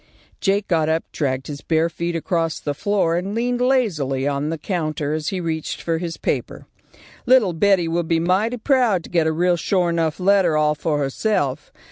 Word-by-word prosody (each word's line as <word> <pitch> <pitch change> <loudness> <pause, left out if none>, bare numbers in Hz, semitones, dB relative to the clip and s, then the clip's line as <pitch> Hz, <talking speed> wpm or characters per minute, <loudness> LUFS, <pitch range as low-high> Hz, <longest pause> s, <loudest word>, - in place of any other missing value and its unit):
Jake 200 +1 0
got 160 -3 +1
up, 160 +1 +1
dragged 135 -3 -2
his 145 -1 -7
bare 160 0 +1
feet 170 +1 -4
across 165 -1 -1
the 145 - -3
floor, 190 0 0
and 195 +4 -3
leaned 245 +1 -1
lazily 160 - +1
on 145 +1 -1
the 165 - -2
counter 155 -3 -2
as 155 -1 -2
he 190 -3 -3
reached 160 -2 -3
for 165 -1 -1
his 170 -1 -5
paper. - - -3 0.6
"Little 240 -8 +5
Betty 185 0 +3
will 170 +1 0
be 165 0 0
mighty 195 +8 +1
proud 235 - +2
to - - -12
get 165 -2 +2
a - - +2
real 175 +2 +1
shore 175 +1 +1
'nuff 165 -1 -1
letter 185 -4 +3
all 150 0 +3
for 150 0 -1
herself. 145 0 -1
170 Hz, 190 wpm, -21 LUFS, 155-195 Hz, 0.6 s, Little